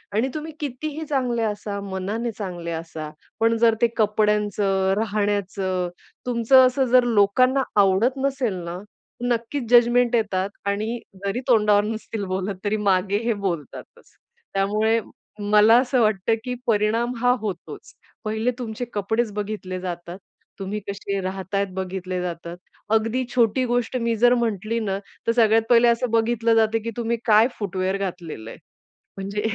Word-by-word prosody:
आणि 235 +5 +2
तुम्ही 310 +1 -5
कितीही 300 +3 -4
चांगले 250 -5 0
असा, 205 -1 -3
मनाने 205 +5 -3
चांगले 175 -4 -5
असा, 160 -2 -6 0.3
पण 230 0 +3
जर 230 -1 +4
ते 235 - +5
कपड्यांचं, 210 -3 +1
राहण्याचं, 200 -4 -1 0.4
तुमचं 250 +2 +5
असं 260 +1 +1
जर 250 -1 +7
लोकांना 245 +4 +3 0.2
आवडत 205 +8 +2
नसेल 265 -6 0
ना, 170 +1 -5 0.5
नक्कीच 240 +3 -1
जजमेंट 240 0 +5
येतात 200 -3 0 0.2
आणि 215 +4 -1 0.3
जरी 200 +4 -1
तोंडावर 210 -4 +4
नसतील 220 -1 -4
बोलत, 190 +1 -2
तरी 215 +1 +1
मागे 190 +2 +2
हे 235 - +1
बोलतातच. 170 -7 -6 0.4
त्यामुळे 215 +3 +2 0.5
मला 215 +2 +7
असं 255 -1 +1
वाटतं, 215 0 +2
की 250 -1 -3
परिणाम 225 +2 +1
हा 245 0 +4
होतोच. 195 -5 -6 0.3
पहिले 220 +3 0
तुमचे 235 0 -4
कपडेच 215 +2 0
बघितले 205 -3 -4
जातात. 175 0 -6 0.4
तुम्ही 200 +2 -3
कसे 200 0 -3
राहता 190 +1 -4
आहेत 200 - +1
बघितले 185 -1 -4
जातात. 170 0 -5 0.4
अगदी 225 +4 +1
छोटी 245 +2 +3
गोष्ट 245 +1 0
मी 230 0 +1
जर 245 0 +6
म्हंटली 230 -1 -1
ना, 195 -3 -2 0.3
तर - - +5
सगळ्यात 225 -1 +4
पहिले 240 0 +6
असं 235 +1 +2
बघितलं 230 0 +2
जातं, 225 0 +3
की 230 - -3
तुम्ही 235 0 -1
काय 220 0 +6
फूटवेअर 190 -1 -1
घातलेलं 175 - -5
आहे. - - -11 0.6
म्हणजे 200 +2 -3
215 Hz, 145 wpm, -23 LUFS, 195-235 Hz, 0.6 s, जर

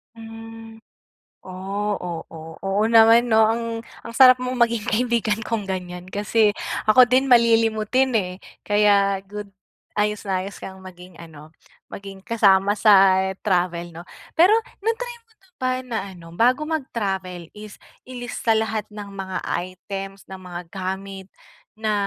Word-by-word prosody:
Hmm. 225 0 -11 0.7
Oh, 195 +3 -4
oo, 165 -2 -8
oo 195 +2 0
naman, 230 +1 +6
'no? 220 -2 +4
Ang, 230 +1 -1 0.4
ang 230 - -9
sarap 255 0 +7
mong 255 0 -3
maging 235 -1 0
kaibigan 230 -2 0
kung 215 -2 -3
ganyan, 180 -1 -5
kasi, 210 +2 +1 0.3
ako 250 +4 +7
din 255 +2 +3
malilimutin 230 +1 +3
eh, 185 -4 0 0.3
kaya 200 -1 +3
good. 205 0 -8 0.4
Ayos 210 0 -1
na 190 -2 -1
ayos 195 +1 -7
kang 190 0 -10
maging 180 -1 -13
ano, 155 -2 -13 0.4
maging 195 -1 -10
kasama 200 -4 +3
sa 195 -3 +6 0.3
travel, 175 -3 0
'no. 170 +2 -10 0.3
Pero, 365 +6 +6 0.3
na-try 465 +3 -2
mo 455 - -37
na 385 - -26
ba 255 0 0
na 240 -3 -4 0.2
ano, 170 -1 -14
bago 250 - +2
mag-travel 195 - -4
is, 210 -1 -11 0.3
ilista 245 -2 -2
lahat 220 -1 -1
ng 210 -1 -9
mga 190 -1 -5
items, 195 +2 -5
ng 190 - -7
mga 180 -1 -7
gamit, 190 0 -5 0.5
na 215 0 -2
210 Hz, 140 wpm, -22 LUFS, 190-230 Hz, 0.7 s, sarap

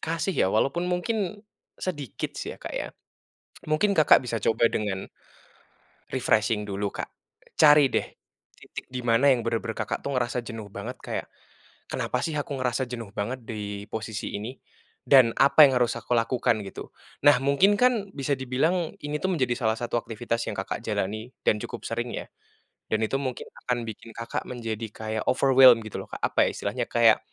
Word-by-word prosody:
kasih 165 +4 -1
ya, 95 - +2
walaupun 140 - +1
mungkin 200 +2 -1 0.4
sedikit 145 - -4 0.2
ya, - - -6
Kak, - - -8
ya. - - -3 0.8
Mungkin 155 +7 +1
Kakak 155 -2 +6
bisa 120 -3 -3
coba 115 +1 +3
dengan 100 -4 -3 1.0
refreshing 110 -4 +1
dulu 100 0 -2
Kak. - - -5 0.5
Cari 150 -3 +7
deh - - 0 0.5
titik - - -10
di 125 -1 -6
mana 120 +4 +4
yang 125 -4 +3
bener-bener 115 -1 -2
Kakak 110 - -3
tuh 140 -2 -3
ngerasa 120 0 0
jenuh 110 -3 -8
banget, 115 +6 -6
kayak - - -4 0.7
kenapa 125 - -1
sih 165 - -2
aku 145 -1 -4
ngerasa 125 0 0
jenuh 115 -5 -6
banget 120 +5 -3
di 105 -2 -5
posisi 110 -1 -5
ini, 120 +6 -6 0.5
dan 130 -4 +7
apa 140 +3 +7
yang 130 -2 +2
harus 120 - +2
aku - - -6
lakukan 115 -1 +1
gitu. - - -8 0.4
Nah, 145 - +8
mungkin 140 +9 +4
kan 235 -6 +2
bisa 140 0 0
dibilang 155 +7 0
ini 145 +1 -2
tuh 190 - +1
menjadi 130 -6 +1
salah 110 -2 +1
satu 120 0 -4
aktivitas 115 +1 -3
yang - - -6
Kakak - - -3
jalani, 110 +5 -2 0.2
dan 105 - +4
cukup - - -7
sering 120 +1 -3
ya, - - -5 0.7
dan 110 - +2
itu 110 - -1
mungkin 130 -2 -4 0.2
akan 120 -1 0
bikin 115 +1 -8
Kakak 115 0 -4
menjadi 115 -3 -4
kayak 110 0 -4
overwhelmed 130 -2 +7
gitu 110 - -6
loh - - -17
Kak, - - -6
apa - - +3
ya - - +1
istilahnya, - - -2
kayak - - +5
125 Hz, 175 wpm, -26 LUFS, 110-140 Hz, 1.0 s, Nah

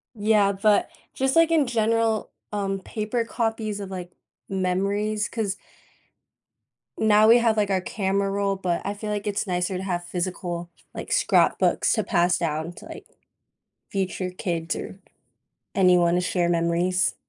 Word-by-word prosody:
Yeah, 210 -2 +3
but, 205 +1 +2 0.2
just, 265 0 0
like, 330 0 +5
in 315 -4 +3
general, 225 -1 +1 0.2
um, 195 -1 -2
paper 220 +4 -2
copies 220 -3 -2
of, 195 -1 -6
like, 180 -2 -7 0.4
memories, 200 +3 -1
'cause 210 -3 -3 1.4
now 215 0 +5
we 235 - +8
have, 230 -2 +2
like, 205 -1 +1
our 190 -1 +2
camera 195 +1 -1
roll, 200 0 0
but 180 -2 -2
I 200 - -2
feel 210 +1 -6
like 205 0 -3
it's 205 +1 -1
nicer 180 0 -1
to 185 - -4
have 175 -2 -2
physical, 175 -1 -4 0.3
like, - - -6
scrapbooks - - +3
to - - +1
pass 175 -3 +2
down 160 0 -2
to, - - -13
like, - - -10 0.8
future 185 -1 -2
kids, 170 -2 -3
or 190 - -7 0.8
anyone 180 -3 +4
to 180 - +2
share 180 -1 0
memories. 175 +2 +1
195 Hz, 150 wpm, -24 LUFS, 180-215 Hz, 1.4 s, we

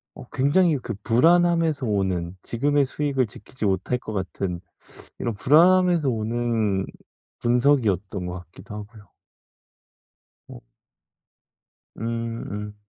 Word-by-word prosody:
어 135 - -10
굉장히 145 +4 +3
그 120 -3 -5
불안함에서 165 +3 +3
오는 95 -5 -1
지금의 145 +4 +1
수익을 140 -1 0
지키지 110 +3 -7
못할 95 +5 0
것 110 - -7
같은 95 -2 -3 0.6
이런 120 - -2
불안함에서 170 - +4
오는 110 -3 0 0.5
분석이었던 115 - +1
것 90 - -4
같기도 90 +4 -12
하고요. 105 -1 -11 1.4
어. - - -11 1.4
음. 115 0 -3
음. 105 0 -6
115 Hz, 230 characters per minute, -24 LUFS, 100-145 Hz, 1.4 s, 불안함에서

